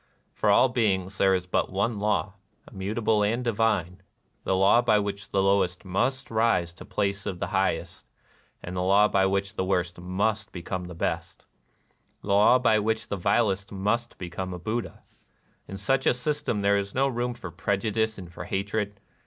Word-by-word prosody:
For - - 0
all - - +6
beings 100 -6 0
there 95 -1 +4
is 90 -1 -2
but 90 - -1
one 100 +3 -1
law, 105 -1 0 0.2
— - - -21
immutable 105 +2 0
and 115 +4 +1
divine: 110 -6 0 0.4
the 95 - +1
law 95 +5 +5
by 110 -3 +3
which 100 -1 -3
the 95 - +1
lowest 95 -2 +1
must 125 +9 -1
rise 110 -6 +2
to 85 - -26
the - - -18
place 100 0 -1
of 95 -3 -3
the - - -2
highest, - - -1 0.3
— - - -36
the 85 - -6
law 100 +3 +5
by 95 -1 +2
which 100 +1 -1
the 95 - -2
worst 90 -2 -1
must 100 +4 -1
become 90 +1 -5
the 90 -1 -9
best, - - -3 0.4
— - - -42
the - - -8
law 105 +5 +6
by 115 -4 +3
which 110 +1 -1
the - - -1
vilest 100 +1 +1
must 105 +4 -1
become 90 +1 -5
a - - -6
Buddha. 110 +7 -4 0.6
In 95 - -7
such 130 +7 +1
a - - +4
system 125 -5 -2
there 100 0 +3
is 100 0 -6
no 135 +1 +3
room 120 -1 -2
for 90 -7 -8
prejudice 110 +5 -1
and 90 -3 -10
for - - -7
hatred. 100 +1 -2
100 Hz, 190 wpm, -26 LUFS, 95-110 Hz, 0.6 s, all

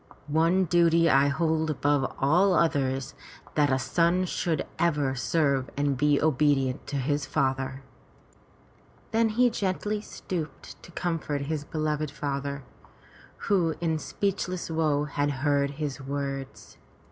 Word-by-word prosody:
One 165 +5 +2
duty 170 0 +4
I 135 +1 +5
hold 160 +2 0
above 145 -2 +1
all 175 +7 +3
others 135 -5 +1 0.2
— - - -21
that 145 -2 +2
a 130 - +3
son 170 +8 +1
should 165 -3 -1
ever 150 -6 +1
serve 135 -1 0
and 145 -1 +1
be 145 +2 +3
obedient 145 -3 +1
to 145 - -4
his 140 +1 -1
father." 135 -1 -1 1.3
Then 225 0 +3
he 240 +3 +3
gently 205 +1 -2
stooped 165 -8 -7
to - - -13
comfort 165 -5 -2
his 145 +1 -3
beloved 155 0 -2
father, 140 -1 -4 0.8
who 175 -5 +2
in 160 -2 0
speechless 185 -1 -2
woe 155 -3 +1
had 145 0 -1
heard 140 0 +1
his 145 -3 -4
words. 135 0 -5
150 Hz, 130 wpm, -27 LUFS, 140-170 Hz, 1.3 s, I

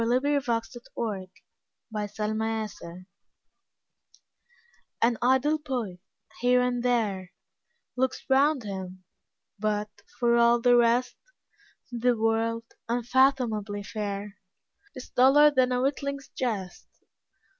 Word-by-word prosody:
Coventry 270 +5 +2
Patmore 230 -4 -4 0.6
The 210 -2 -4
Revelation 215 -5 -3 1.9
AN 235 +1 +3
idle 265 +5 +2
poet, 245 -11 -4 0.4
here 250 0 +3
and 250 -1 0
there, 210 -7 0 0.6
Looks 260 0 -1
round 275 0 +3
him, 190 -2 -7 0.6
but, 210 0 -1 0.3
for 235 -1 +3
all 235 0 +5
the 245 +1 +4
rest, 240 +1 +2 0.7
The 245 0 +1
world, 225 +1 0 0.3
unfathomably 235 -4 +1
fair, 205 -1 -5 0.6
Is 255 - -10
duller 285 +4 +6
than 255 -2 +2
a 250 0 +1
witling's 280 0 -2
jest. 205 -8 -4
235 Hz, 95 wpm, -27 LUFS, 210-255 Hz, 1.9 s, duller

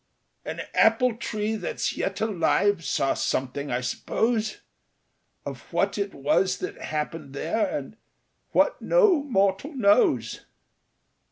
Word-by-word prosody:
"An - - -5
apple 225 +2 +4
tree 215 -1 -2
that's 195 -5 -3
yet 195 - -3
alive 205 -2 +2
saw 135 -1 +1
something, 140 +2 -2
I 125 0 -1
suppose, 220 - -1 0.8
Of - - -8
what - - 0
it 200 0 -3
was 145 +7 +1
that 390 +2 -6
happened 150 -2 -4
there, 205 +9 0
and 145 +9 -5 0.5
what - - +2
no 430 -11 +4
mortal 205 +2 0
knows. 200 - +3
200 Hz, 115 wpm, -25 LUFS, 150-225 Hz, 0.8 s, apple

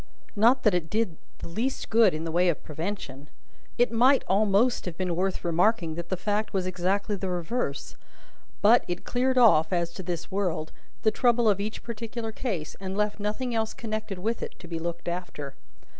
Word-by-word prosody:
Not 235 +5 +4
that 215 - +4
it 170 -3 -1
did 210 -7 -1 0.2
the - - -8
least 230 +10 -3
good 220 -6 +5
in 155 - -4
the 165 - -3
way 175 +2 +3
of 170 - -2
prevention 155 -4 -5 0.5
it 240 -2 +3
might 255 +4 +4
almost 210 +5 +3
have 175 -3 -5
been 180 -2 -1
worth 185 +1 -1
remarking 175 0 +2
that 170 +1 -6
the 185 - -1
fact 210 +4 -1
was 190 -2 0
exactly 185 +3 0
the 190 -1 -4
reverse 175 - -3 0.7
but, 230 +4 +6
it 175 0 -4
cleared 255 +1 +1
off 165 -10 +6
(as 170 -2 0
to 190 - -6
this 175 -2 -5
world) 180 -5 -1 0.3
the 220 - +4
trouble 240 -1 +3
of 200 -2 +3
each 215 +2 -4
particular 230 0 -5
case, 195 -10 -4
and 190 0 -4
left 210 0 0
nothing 215 +5 -2
else 220 -1 -1
connected 215 -3 -4
with 225 +6 -2
it - - -6
to 175 - -12
be 165 -1 -4
looked 170 +1 -5
after. 170 -5 -4
195 Hz, 190 wpm, -27 LUFS, 170-225 Hz, 0.7 s, but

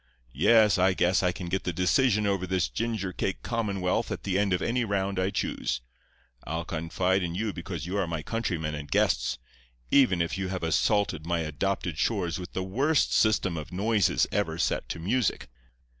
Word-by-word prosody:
Yes, 105 - +5
I 95 +1 +3
guess 90 +1 +2
I 90 -1 +2
can 90 0 -7
get 95 +2 -1
the 90 - -1
decision 105 - +2
over 100 -2 0
this 90 -3 +1
ginger 100 - -2
cake 95 - -3
commonwealth 100 -6 -1
at - - -4
the 95 -1 0
end 100 -1 +1
of 90 - +2
any 120 +5 0
round 100 -3 -1
I 95 +1 +1
choose. 80 - -2 0.6
I'll 80 +1 -4
confide 90 +4 0
in 85 -1 -3
you 105 +1 -2
because 85 -3 -6
you 95 +3 -3
are 95 - 0
my 80 -2 -3
countrymen 85 -9 -2
and 75 -1 -6
guests, - - +1 0.5
even 125 -11 +5
if 85 +3 -1
you 95 - -2
have 90 -2 -4
assaulted 80 0 +1
my 85 -1 0
adopted 80 +1 -2
shores 95 -4 0
with 90 +1 -8
the 95 - -2
worst 135 +11 +1
system 100 -5 +2
of 80 +2 -7
noises 105 +3 +2
ever 85 -6 -1
set - - -1
to - - -3
music. 105 - -1
95 Hz, 190 wpm, -27 LUFS, 85-100 Hz, 0.6 s, Yes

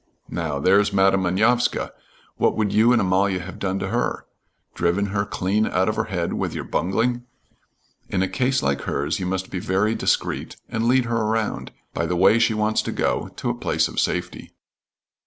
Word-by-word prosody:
Now, 80 -4 -2
there's 100 +7 +3
Madam 95 0 +3
Manovska. 110 +7 +1 0.5
What - - +1
would 105 -2 0
you 115 +3 +5
and 120 - +4
Amalia 95 -1 +2
have 95 +1 -9
done 95 -1 -1
to 95 - -3
her? 120 +3 -1 0.5
Driven 90 +4 +1
her 100 0 0
clean 105 +3 0
out 95 +1 +1
of 110 - 0
her 110 0 -1
head 90 -5 -2
with - - -2
your - - -3
bungling. 120 +7 -1 0.8
In 95 -1 0
a - - +1
case 130 +7 0
like 70 0 0
hers 70 +9 -2
you 90 - -2
must 95 0 -3
be 95 - -3
very 100 +5 +1
discreet, - - -1
and 115 +1 -1
lead 130 0 +3
her 115 0 -1
around, 110 0 -1 0.2
by 85 - -1
the 90 - -1
way 95 +6 +5
she 110 - +2
wants 110 0 +1
to - - -4
go, - - -1
to - - -2
a - - -2
place - - 0
of - - -4
safety." - - -3
100 Hz, 195 wpm, -23 LUFS, 95-110 Hz, 0.8 s, you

